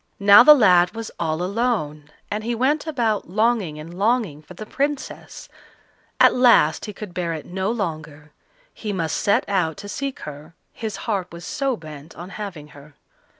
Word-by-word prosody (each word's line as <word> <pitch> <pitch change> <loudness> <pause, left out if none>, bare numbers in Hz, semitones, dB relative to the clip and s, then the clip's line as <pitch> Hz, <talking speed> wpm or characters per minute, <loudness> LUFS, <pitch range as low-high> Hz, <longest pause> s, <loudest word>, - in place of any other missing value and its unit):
Now 200 +3 +8
the 300 +4 +9
lad 180 -5 +4
was 225 -1 -6
all 160 0 -1
alone, 185 -8 -2 0.2
and 210 +1 -3
he 235 +1 -2
went 290 +6 0
about 230 - -1
longing 215 -5 0
and 160 +3 -9
longing 200 - 0
for 175 +4 -14
the 215 - -8
Princess; 280 +4 -4 0.7
at - - +6
last 240 -11 +4
he 210 - -6
could 205 -2 -9
bear 170 -2 -2
it 155 - -7
no 190 +2 -3
longer; 155 -8 -5 0.4
he 210 -2 -5
must 165 -4 -2
set 200 - +1
out 180 -5 0
to 205 +1 -9
seek 275 +5 -5
her, 150 +2 -10 0.2
his 220 -3 -5
heart 195 -5 -2
was 170 +1 -10
so 270 +1 -2
bent 155 -1 -11
on 175 +2 -9
having 185 -9 -7
her. 145 0 -16
195 Hz, 175 wpm, -22 LUFS, 160-230 Hz, 0.7 s, the